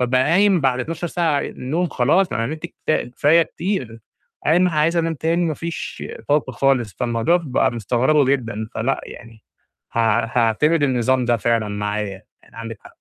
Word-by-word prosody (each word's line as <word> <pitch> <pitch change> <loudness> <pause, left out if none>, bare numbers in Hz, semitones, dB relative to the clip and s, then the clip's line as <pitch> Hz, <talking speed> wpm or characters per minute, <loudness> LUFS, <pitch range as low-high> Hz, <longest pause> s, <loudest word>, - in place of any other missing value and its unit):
بابقى 125 +1 +2
قايم 185 +5 +3
بعد 130 -2 +1
12 165 +5 -4
ساعة 160 -4 0
نوم 160 +8 -1
خلاص، 155 +8 +2
أنا 115 - -1
نِمت 155 +5 -5
كفا 155 - -2
كفاية 145 +7 +3
كتير، 165 - -4 0.5
قايم 175 +4 +4
عايز 160 +1 +1
أنام 165 -1 0
تاني 165 +4 0
ما 160 -2 -1
فيش 170 +2 -6 0.3
طاقة 145 -3 +1
خالص، 125 -7 +1
فالموضوع 120 +7 +1
بقى 130 -1 +1
مستغربه 125 +6 +2
جدًا. 115 -5 -1
فلأ 130 +5 -1
يعني، 115 -2 -12 0.5
حاع 115 0 +1
حاعتمد 120 +7 +2
النظام 130 -1 +2
ده 120 0 +2
فعلًا 115 -1 0
معايا، 105 -1 -3 0.2
يعني - - -21
عندِك 115 -1 -7
حق. - - -14
130 Hz, 160 wpm, -21 LUFS, 115-160 Hz, 0.5 s, قايم